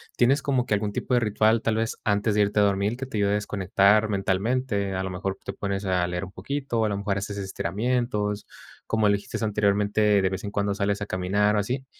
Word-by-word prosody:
¿Tienes 135 +4 +3
como 130 -4 0
que 110 - -1
algún 105 0 -2
tipo 125 - -2
de 125 - +5
ritual, 110 0 +2
tal 115 - 0
vez 115 +1 -1
antes 105 0 +1
de 105 - +4
irte 105 +1 +1
a - - +5
dormir? 100 +2 +1
Que 135 - -4
te 120 - -5
ayude 100 -1 +2
a - - +2
desconectar 100 +1 +2
mentalmente. 100 +2 0
A 95 0 -2
lo 95 - -3
mejor 95 +1 -3
te - - -4
pones 100 0 -3
a 90 -2 +1
leer 90 +1 -3
un 95 - -7
poquito, 135 -3 -2
a - - 0
lo 100 - -2
mejor 100 -1 -1
haces 100 0 -4
estiramientos. 105 +2 -2 0.4
Como 110 -2 +2
lo 100 - +4
dijiste 100 +2 -3
anteriormente, 105 0 +2
de 95 - +2
vez 95 0 -5
en 100 - -4
cuando 100 0 0
sales 100 0 -1
a - - -1
caminar 100 +3 +1
o 105 - +2
así. 130 +6 -2
105 Hz, 235 wpm, -25 LUFS, 100-110 Hz, 0.4 s, de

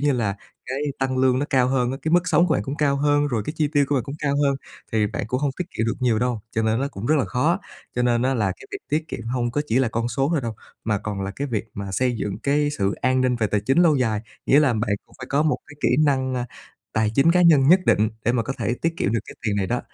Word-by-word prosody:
như 145 -1 +2
là, 110 -5 -1 0.3
cái 130 +2 -3 0.2
tăng 130 -1 -1
lương 130 -1 +3
nó 145 - -1
cao 130 -2 +3
hơn 125 -2 +1
á, 135 - -3
cái 160 - -1
mức 175 +1 +3
sống 170 +3 +4
của - - +2
bạn - - 0
cũng 135 +2 -5
cao 140 -2 +2
hơn, 145 +1 +2
rồi 115 -6 -1
cái 150 - -2
chi 150 -2 +1
tiêu 145 -1 +4
của 145 - +1
bạn 130 - 0
cũng 140 0 -6
cao 140 -1 0
hơn, 140 -1 +2 0.4
thì 110 -1 +2
bạn 100 - -4
cũng 125 +4 -2
hông 145 - +1
tiết 180 - -1
kiệm 110 - -2
được 115 - 0
nhiều 120 -4 +2
đâu, 120 -2 -1
cho 110 - 0
nên 110 +3 +1
nó 140 - -1
cũng 110 -4 -7
rất 155 - +3
là - - +1
khó 130 +6 +1
á. 190 - -1 0.4
Cho 125 - 0
nên 120 -1 +2
á 130 +1 +1
là 105 -5 +1
cái - - -14
việc - - -3
tiết 155 +2 -1
kiệm 115 - -6
hông 120 0 -1
có 145 +5 -1
chỉ 115 +3 +2
là 130 -3 +2
con 115 +1 -2
số 135 +4 0
thôi 155 - +1
đâu, 115 -3 -4 0.3
mà 105 -2 +1
còn 105 -2 -5
là 95 - -3
cái 140 - -2
việc 110 -4 -2
mà 100 -1 -5
xây 125 +2 +1
dựng 100 -1 -3
cái 145 +1 +2
sự 100 0 +1
an 130 +1 +2
ninh 125 -1 +2
về 110 -2 +1
tài 105 0 0
chính 135 +9 +1
lâu 155 -4 +4
dài. 110 -5 0 0.3
Nghĩa 140 +3 +6
là 135 -5 +3
bạn 110 -1 -1 0.2
cũng - - -23
phải 130 - -7
có 145 +2 +2
một 155 - +1
cái 145 - -14
kỹ - - +2 0.2
năng, 130 -2 +1
a, 125 0 -2 0.5
tài 110 -1 +1
chính 160 +7 +5
cá 180 - +4
nhân 150 -5 +6
nhất 185 +2 +7
định 110 +1 +4 0.2
để 120 - +2
mà 120 - +1
có 135 +4 -3
thể 120 - 0
tiết 165 +1 0
kiệm 105 - 0
được 115 - +1
cái - - -10
tiền 105 -1 +1
này 95 -2 0
đó. 120 +1 -1
130 Hz, 315 wpm, -23 LUFS, 115-145 Hz, 0.5 s, nhất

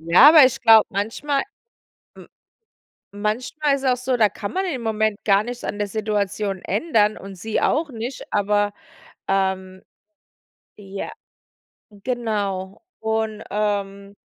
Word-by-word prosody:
Ja, 170 - +7
aber 310 -3 +9
ich 255 - +1
glaube, 225 -3 +7
manchmal, 230 +8 -1 0.7
w - - -13 0.9
manchmal 245 +8 -1
ist 275 - -6
es 260 - +3
auch 250 - +1
so, 255 -1 +1
da 215 - +5
kann 200 - -6
man 380 +1 -1
im 275 -10 -3
Moment 220 -1 -1
gar 200 0 +3
nichts 245 +1 -7
an 205 - -4
der 205 0 -1
Situation 205 -2 -2
ändern 215 - +1
und 195 0 -10
sie 220 +4 -2
auch 310 +2 +1
nicht, 235 +3 -6
aber, 205 0 +1 0.5
ähm 190 -1 -1 1.0
ja, 195 -1 -6 0.8
genau. 205 -4 -3 0.2
Und, 220 -1 -2
ähm, 200 -1 -2
210 Hz, 135 wpm, -22 LUFS, 200-240 Hz, 1.0 s, aber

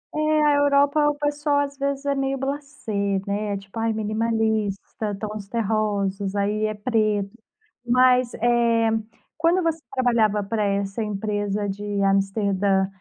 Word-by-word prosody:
É, 305 0 +2
a 295 -1 +4
Europa, 285 +1 +3
o 295 - -1
pessoal 290 0 0
às 280 0 -3
vezes 280 0 -2
é 280 - +2
meio 270 0 -1
blasé, 280 -3 -5 0.3
né, 205 +1 -2
é - - -2
tipo: 195 +3 -9
"Ai, 225 0 +1
minimalista, 220 -1 -1
tons 210 -2 -6
terrosos, 205 -3 -1
aí 210 +2 0
é 215 - -3
preto." 210 -3 0 0.5
Mas, 250 0 +4
eh, 235 -1 +2 0.5
quando 335 +3 +2
você 330 -1 0
trabalhava 230 -6 +2
para 210 +1 -1
essa 200 +1 -1
empresa 205 0 -2
de 200 +1 -5 0.2
Amsterdã, 195 0 +1
220 Hz, 140 wpm, -23 LUFS, 205-275 Hz, 0.5 s, a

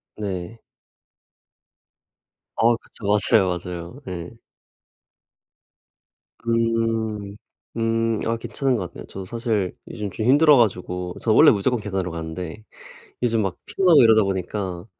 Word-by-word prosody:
네. 100 +1 -5 2.0
어 115 +1 +4
그쵸. 115 - -19
맞아요, 100 -2 +3
맞아요. 90 - -8
예. 85 -2 -5 2.2
음. 115 -3 -1 0.4
음 115 -1 0
아 115 0 0
괜찮은 125 +3 -1
것 95 -6 -3
같네요. - - -10
저도 95 -1 -8
사실 110 -3 -2 0.2
요즘 105 -1 -4
좀 110 - -4
힘들어 145 +3 +6
가지고 90 -5 0
저 115 - +1
원래 - - +7
무조건 115 +4 +1
계단으로 95 -3 -3
가는데 80 +4 -6 0.6
요즘 115 -2 +2
막 95 -3 -2
피곤하고 180 -7 +4
이러다 110 -1 +6
보니까 95 -1 -3
105 Hz, 240 characters per minute, -23 LUFS, 95-115 Hz, 2.2 s, 원래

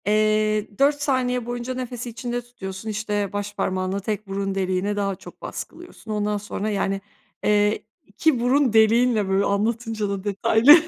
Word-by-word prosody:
Eee, 215 0 +2
4 285 +1 +4
saniye 250 -4 +1
boyunca 240 +1 -3
nefesi 245 -1 -5
içinde 240 +1 -3
tutuyorsun, 220 -4 -7
işte, 205 -2 -2
başparmağınla 195 -2 -1
tek 210 +1 -3
burun 195 0 -2
deliğine 190 +1 0
daha 200 -1 0
çok - - -13
baskılıyorsun. 340 -9 -8
Ondan 210 0 0
sonra, 210 +1 -3
yani, 195 -1 0 0.4
eee, 210 0 +3 0.2
2 250 +6 +1
burun 250 0 +3
deliğinle 220 -1 +4
Böyle 195 +1 +3
anlatınca 220 +1 0
da 200 -1 -3
detaylı 220 +6 +6
215 Hz, 145 wpm, -24 LUFS, 200-240 Hz, 0.4 s, detaylı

